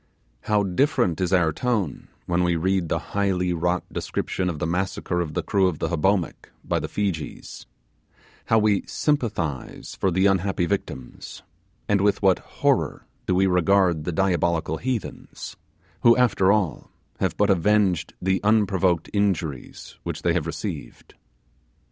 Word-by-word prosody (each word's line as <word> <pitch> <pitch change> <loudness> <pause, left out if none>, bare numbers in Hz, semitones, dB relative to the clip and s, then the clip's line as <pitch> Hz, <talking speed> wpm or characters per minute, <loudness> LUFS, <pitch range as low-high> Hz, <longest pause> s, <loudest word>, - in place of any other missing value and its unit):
How 105 -1 +2
different 95 - +1
is 90 - 0
our 85 -4 +3
tone 105 - -2 0.2
when 90 0 +1
we 85 -1 +2
read 90 0 0
the - - +1 0.2
highly 95 -3 +1
wrought 90 +1 0
description 90 -1 -2
of 85 - -4
the - - -2
massacre 90 0 -1
of 75 -3 -5
the - - -1
crew 95 -2 +2
of 90 -4 -2
the - - -2
Hobomak 90 +2 0 0.2
by - - 0
the - - -4
Feejees; 95 -6 -4 0.8
how 115 - +3
we 105 -2 +3
sympathize 105 - -2
for 95 - 0
the 95 +2 +2
unhappy 95 -1 +2
victims, 85 -9 -5 0.4
and 100 -1 +2
with 100 0 +2
what 95 -2 +4
horror - - -1 0.2
do 90 - +2
we 95 +1 +3
regard 90 -2 +3
the 90 - -2
diabolical 85 -3 0
heathens, 125 0 -5 0.5
who, 115 +1 +6
after 100 -6 +3
all, 100 -8 0 0.3
have - - -1
but 105 -1 +3
avenged 95 -2 +2
the 95 +1 0
unprovoked 95 -5 +2
injuries 95 - -2
which - - -5
they - - +2
have - - -1
received. - - -6
95 Hz, 150 wpm, -24 LUFS, 85-100 Hz, 0.8 s, who